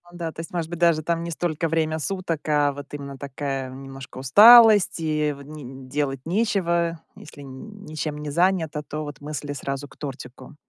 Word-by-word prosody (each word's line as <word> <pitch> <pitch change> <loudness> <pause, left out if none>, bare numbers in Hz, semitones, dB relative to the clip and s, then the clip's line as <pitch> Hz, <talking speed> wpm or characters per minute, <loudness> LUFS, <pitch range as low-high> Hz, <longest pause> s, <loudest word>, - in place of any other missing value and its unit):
Ну 175 - -13
да, 165 -2 -4
то - - -13
есть, 165 - -7
может 170 -2 -3
быть, 175 -1 -6
даже 170 -2 +3
там 170 +1 -1
не 170 - -5
столько 165 -1 -2
время 160 0 0
суток, 170 -1 -3
а 145 -1 +3
вот 145 0 -10
именно 140 -1 -7
такая 135 -1 -4
немножко 135 0 -10
усталость, 210 - +7
и 155 -2 0
в 140 - -12
н 135 -3 -10
делать 135 -1 -2
нечего. 170 -4 0 0.2
Если 150 - -13
н 200 +11 -11
ничем 155 -2 -4
не 150 -1 -5
занято, 170 -2 +1
то 150 +1 -6
вот 145 -1 -9
мысли 145 -1 -5
сразу 140 +1 -5
к 135 - -20
тортику. 130 -1 -9
150 Hz, 190 wpm, -24 LUFS, 140-170 Hz, 0.2 s, усталость